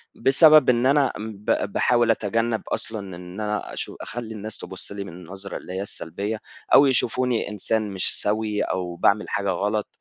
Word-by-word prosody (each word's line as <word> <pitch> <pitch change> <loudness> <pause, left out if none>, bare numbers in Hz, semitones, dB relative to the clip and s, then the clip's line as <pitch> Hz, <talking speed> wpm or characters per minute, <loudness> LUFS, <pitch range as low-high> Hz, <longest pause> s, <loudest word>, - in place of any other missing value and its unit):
بسبب 150 0 +6
إن 120 0 +3
أنا 140 0 +3
ب 105 -1 -2
باحاول 120 -2 +3
أتجنّب 115 +1 -1
أصلًا 110 -1 -2 0.2
إن 90 +2 -10
أنا 105 0 -3
أشو - - -3
أخلّي 115 -2 -6
الناس 110 0 -5
تبُصّ 95 +2 -6
لي 100 0 -5
من 100 - -10
النظرة 95 +3 -8
اللي 90 - -9
هي 95 - -3
السلبية، 100 +3 -4 0.3
أو 140 - +8
يشوفوني 125 -3 +2
إنسان 105 +1 0
مش 95 -1 +2
سوي 105 0 0
أو 90 -2 -3
باعمل 100 +4 +2
حاجة 100 0 -1
غلط، 105 +3 -1
105 Hz, 170 wpm, -23 LUFS, 100-115 Hz, 0.3 s, أو